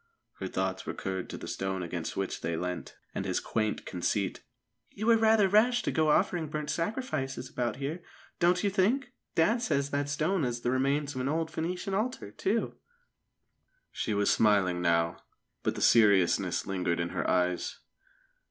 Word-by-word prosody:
Her 95 Hz, -, -3 dB
thoughts 95 Hz, 0 st, -2 dB
recurred 95 Hz, -1 st, -4 dB
to -, -, -6 dB
the -, -, -8 dB
stone 95 Hz, -1 st, -2 dB
against 85 Hz, -1 st, -4 dB
which 95 Hz, -1 st, -2 dB
they 85 Hz, -1 st, -2 dB
leant, 90 Hz, +1 st, -4 dB, 0.2 s
and -, -, -2 dB
his -, -, 0 dB
quaint 110 Hz, -1 st, -2 dB
conceit. 95 Hz, +2 st, -1 dB, 0.5 s
"You 215 Hz, -, -5 dB
were 230 Hz, 0 st, +6 dB
rather 220 Hz, -2 st, +5 dB
rash 220 Hz, +4 st, +4 dB
to -, -, 0 dB
go 155 Hz, -2 st, +2 dB
offering 160 Hz, +1 st, +2 dB
burnt 150 Hz, -1 st, -3 dB
sacrifices 135 Hz, -, -3 dB
about 120 Hz, -1 st, -1 dB
here, 145 Hz, +6 st, -4 dB, 0.4 s
don't 175 Hz, +1 st, +3 dB
you 200 Hz, -, +2 dB
think? 240 Hz, +7 st, +1 dB, 0.2 s
Dad 215 Hz, +9 st, +3 dB
says 140 Hz, -, 0 dB
that 145 Hz, 0 st, -1 dB
stone 155 Hz, +4 st, 0 dB
is 120 Hz, -1 st, -2 dB
the 120 Hz, -, 0 dB
remains 140 Hz, +2 st, +1 dB
of 130 Hz, -, -3 dB
an 130 Hz, -, -1 dB
old 160 Hz, +1 st, -1 dB
Phœnician 180 Hz, +5 st, -3 dB
altar, 215 Hz, -, -2 dB
too." 210 Hz, -, -1 dB, 1.1 s
She 110 Hz, -, -2 dB
was 100 Hz, 0 st, +3 dB
smiling 100 Hz, -5 st, +3 dB
now, 85 Hz, -1 st, +2 dB, 0.4 s
but -, -, -1 dB
the -, -, -2 dB
seriousness 100 Hz, -6 st, +4 dB
lingered 90 Hz, -3 st, -1 dB
in 85 Hz, 0 st, -1 dB
her -, -, -2 dB
eyes. 90 Hz, -1 st, 0 dB
135 Hz, 170 wpm, -30 LUFS, -, 1.1 s, were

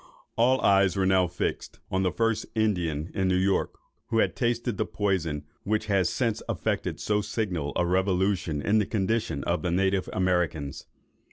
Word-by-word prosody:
All 125 Hz, +3 st, +3 dB
eyes 95 Hz, -2 st, +4 dB
were 95 Hz, -, +2 dB
now 95 Hz, -1 st, +3 dB
fixed 90 Hz, +1 st, -4 dB
(on 95 Hz, -, +1 dB
the 90 Hz, -1 st, +1 dB
first 115 Hz, -1 st, 0 dB
Indian 90 Hz, -8 st, 0 dB
in 95 Hz, -1 st, 0 dB
New 90 Hz, -, +2 dB
York 95 Hz, +1 st, +1 dB, 0.3 s
who 115 Hz, -, -1 dB
had -, -, +2 dB
tasted 120 Hz, -2 st, -1 dB
the -, -, +1 dB
poison 90 Hz, -8 st, -1 dB, 0.2 s
which 110 Hz, +1 st, -1 dB
has 100 Hz, -4 st, +2 dB
since 115 Hz, -4 st, -1 dB
affected -, -, -2 dB
so 105 Hz, 0 st, +1 dB
signal 90 Hz, -9 st, -2 dB
a 90 Hz, -, +2 dB
revolution 95 Hz, -3 st, 0 dB
in 110 Hz, +2 st, +3 dB
the 105 Hz, -, 0 dB
condition 110 Hz, -7 st, -1 dB
of 85 Hz, +1 st, 0 dB
the 90 Hz, -, -1 dB
native 95 Hz, +2 st, +1 dB
Americans). 90 Hz, -6 st, -1 dB
95 Hz, 170 wpm, -27 LUFS, 90-105 Hz, 0.3 s, eyes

